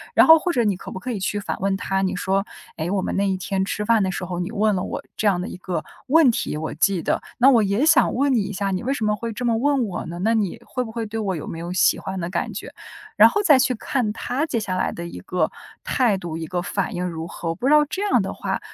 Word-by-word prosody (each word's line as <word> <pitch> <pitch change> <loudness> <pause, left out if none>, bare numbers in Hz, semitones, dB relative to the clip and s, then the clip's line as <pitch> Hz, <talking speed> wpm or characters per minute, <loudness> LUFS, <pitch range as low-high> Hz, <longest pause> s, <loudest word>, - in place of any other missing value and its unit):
然 - - +7
后 320 0 +8
或 355 - -1
者 245 -7 +1
你 205 -3 +1
可 180 - -9
不 - - -6
可 250 +6 -5
以 220 - -3
去 205 +2 -1
反 200 - -3
问 195 0 0
他， 195 0 -1
你 190 -1 0
说， 190 +1 0 0.3
哎， 160 +2 -2
我 195 +1 0
们 - - -2
那 200 0 +1
一 190 - 0
天 190 +1 -1
吃 210 +2 -3
饭 225 0 +4
的 190 -1 0
时 180 - -4
候， 175 -1 -4
你 180 +3 -3
问 215 -1 +1
了 185 - -1
我 - - -5
这 215 - 0
样 190 -3 +3
的 180 - -4
一 - - -7
个 180 -3 -4 0.2
问 295 -1 +6
题， 185 - -3
我 155 +1 -4
记 170 +3 +1
得。 - - 0 0.2
那 255 +2 +6
我 235 -4 +5
也 205 +8 +1
想 320 - +4
问 275 +2 +2
你 235 - +3
一 200 0 -4
下， 200 0 -1
你 185 - -1
为 260 - -1
什 230 -6 -2
么 210 0 +2
会 230 +2 -5
这 245 +4 -4
么 230 -1 +2
问 275 +1 +2
我 190 -5 -4
呢？ 170 - -6
那 225 +2 +3
你 210 -5 -1
会 250 - -3
不 225 - -8
会 230 0 -3
对 220 +1 -4
我 195 -4 -1
有 155 - -6
没 165 - -6
有 170 +1 -5
喜 185 - +3
欢 190 0 -5
的 170 - -3
感 - - -2
觉？ - - -7 0.4
然 - - +8
后 415 - 0
再 295 -9 +6
去 255 0 +2
看 235 -1 -1
他 260 +6 -2
接 275 -8 -1
下 195 -4 -3
来 - - 0
的 170 - -6
一 90 - -8
个 180 - -1 0.3
态 240 -7 +2
度， 170 -3 -5
一 165 - -4
个 180 +2 -2
反 195 +1 -2
应 180 +1 -2
如 165 -1 -5
何。 170 - -5
我 165 - -2
不 250 - -2
知 290 - +5
道 300 0 +6
这 380 - -3
样 - - +3
的 - - -4
话， - - -3
200 Hz, 325 characters per minute, -22 LUFS, 185-240 Hz, 0.4 s, 后